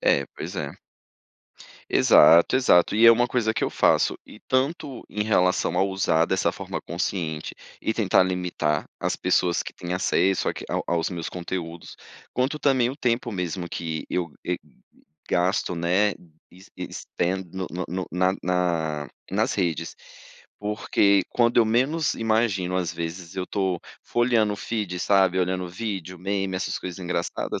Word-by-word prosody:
É, 70 -1 +3
pois - - -7
é. - - -4 1.1
Exato, 85 +9 +6
exato, 105 -7 +4
e 115 +1 +6
é 115 - +10
uma 120 +1 +2
coisa 110 -3 0
que - - -2
eu - - +1
faço, - - +2
e 105 - -14
tanto, 135 0 -1
em 105 - -2
relação 90 -4 +2
a 95 - +4
usar 95 -4 +2
dessa - - +1
forma - - -6
consciente 85 -3 -3 0.3
e - - -1
tentar 90 - +3
limitar 90 -5 -1
as - - -1
pessoas 90 -1 +1
que - - -8
têm 90 +1 -5
acesso 95 0 +1
aqui - - -4
ao - - -1
aos 85 -2 0
meus 85 -3 -4
conteúdos, 85 -1 -6 0.4
quanto 130 +4 0
também 130 -4 +2
o 135 - -8
tempo 120 -2 0
mesmo 90 -2 -3
que 80 -2 -4
eu 90 -2 -1 0.2
eh, 90 0 -1 0.7
gasto, 90 0 +1
né, 90 +5 +2 0.4
es 95 +2 -17
esse - - -7
tem 90 +2 +1 0.2
no 95 -1 -4
no 90 +1 -3
no 90 +1 -3
na 90 +2 +2
na 85 -5 0 0.2
nas 105 +3 +1
redes. 85 -6 -1 0.7
Porque, 105 -1 +2
quando 120 0 +3
eu 115 - +6
menos 135 +8 +1
imagino, 110 -5 0
às 90 -3 -1
vezes, 85 +2 -6
eu 95 - -1
estou 95 -2 -1 0.2
folheando 120 -3 +2
o - - -9
feed, 100 -4 -3
sabe. 95 -1 +3
Olhando 90 0 -1
vídeo, 90 -2 -5
meme, 95 0 -2
essas 95 - -2
coisas 90 -1 -6
engraçadas 85 -1 -3
95 Hz, 160 wpm, -25 LUFS, 85-110 Hz, 1.1 s, é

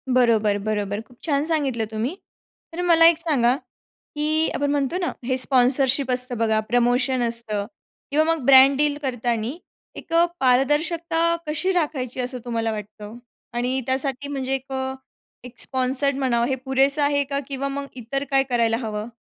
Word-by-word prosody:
बरोबर, 220 -5 +3
बरोबर. 205 0 -3
खूप 245 +2 -20
छान 290 -2 0
सांगितलं 280 -8 -1
तुम्ही. 225 +9 -3 0.6
तर 345 - -4
मला 335 -2 +5
एक 335 -1 +5
सांगा, 265 -7 +2
की 305 +1 -4
आपण 285 0 -1
म्हणतो 285 +4 -1
ना, 345 - -1
हे 255 +1 0
स्पॉन्सरशिप 260 +1 +3
असतं 250 0 +2
बघा, 220 -1 +1
प्रमोशन 245 +2 +1
असतं 230 -3 0 0.5
किंवा 305 +2 +3
मग 310 -6 -6
ब्रँड 270 +1 +7
डील 295 0 +1
करतानी 245 0 -2 0.4
एक - - -9 0.3
पारदर्शकता 325 +6 +1
कशी 310 +5 -1
राखायची, 285 -8 -2
असं 250 +1 -3
तुम्हाला 230 -2 -2
वाटतं? 210 0 -8 0.4
आणि 250 +2 -1
त्यासाठी 265 +1 -1
म्हणजे 270 -2 -3
एक 270 0 -8
अ, 265 0 -3 0.5
एक 250 -1 -11
स्पॉन्सर्ड 265 +2 +1
म्हणावं, 240 -3 +1
हे 265 - 0
पुरेसं 270 +2 +2
आहे 285 0 +2
का? 280 0 -3
किंवा 275 0 -3
मग 280 0 -4
इतर 260 +3 -4
काय 270 0 +4
करायला 230 -2 +1
हवं? 215 -2 -5
265 Hz, 155 wpm, -22 LUFS, 240-285 Hz, 0.6 s, ब्रँड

